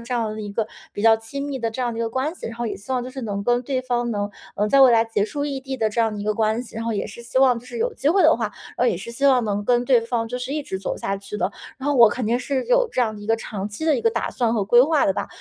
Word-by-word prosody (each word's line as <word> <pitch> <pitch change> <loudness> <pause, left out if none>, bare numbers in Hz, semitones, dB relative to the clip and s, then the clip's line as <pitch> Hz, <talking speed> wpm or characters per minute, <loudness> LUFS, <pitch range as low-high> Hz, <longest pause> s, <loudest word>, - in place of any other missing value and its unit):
这 235 +2 -4
样 230 -3 0
的 215 - -6
一 205 -1 -5
个 215 +2 -1 0.3
比 205 - -4
较 225 0 +7
亲 275 +6 -6
密 280 -2 -4
的 230 -2 -1
这 255 +3 -4
样 240 -1 -1
的 225 - -6
一 - - 0
个 230 - -1
关 260 +7 -2
系， - - -8
然 225 - -7
后 240 0 -2
也 - - -3
希 200 - -13
望 250 -1 0
就 255 - -7
是 265 +1 -7
能 200 -3 -3
跟 245 +1 +2
对 255 0 -2
方 240 -1 -1
能 205 -2 -2 0.3
能 210 - +1
在 275 +5 +5
未 265 -2 +8
来 225 -1 +4
结 225 -3 -1
束 285 +6 -3
异 280 -2 -3
地 265 0 -5
的 220 -3 0
这 230 - 0
样 225 -1 +2
的 - - -6
一 - - -5
个 215 - +1
关 220 +2 +1
系， 235 - -12
然 225 - -3
后 230 - -1
也 205 - -2
是 215 +3 -10
希 240 +2 -1
望 260 -3 +5
就 240 - -14
是 - - -8
有 475 +2 0
机 280 - 0
会 370 +4 +4
的 320 0 +6
话， 225 -3 -2 0.4
也 - - 0
是 195 +6 -7
希 275 +4 0
望 255 -3 +4
能 205 -1 -1
跟 245 +2 +2
对 245 -2 +4
方 230 0 -2
就 250 - -4
是 250 +2 -4
一 300 0 -2
直 190 -8 -5
走 190 - -3
下 195 - -2
去 200 +1 -7
的。 205 - 0 0.3
然 265 - -6
后 290 - +2
我 235 -4 +8
肯 245 +3 -3
定 235 +3 +1
是 265 0 -2
有 - - +3
这 - - -1
样 220 -2 -1
的 - - -10
一 205 - -9
个 225 +1 +2
长 205 -3 -5
期 210 +9 -6
的 315 -2 +4
一 - - -2
个 230 - +3
打 230 0 -2
算 235 -2 0
和 210 -3 0
规 240 +5 +6
划 300 +1 +3
的 195 - +3
吧。 - - -3
235 Hz, 380 characters per minute, -22 LUFS, 220-260 Hz, 0.4 s, 未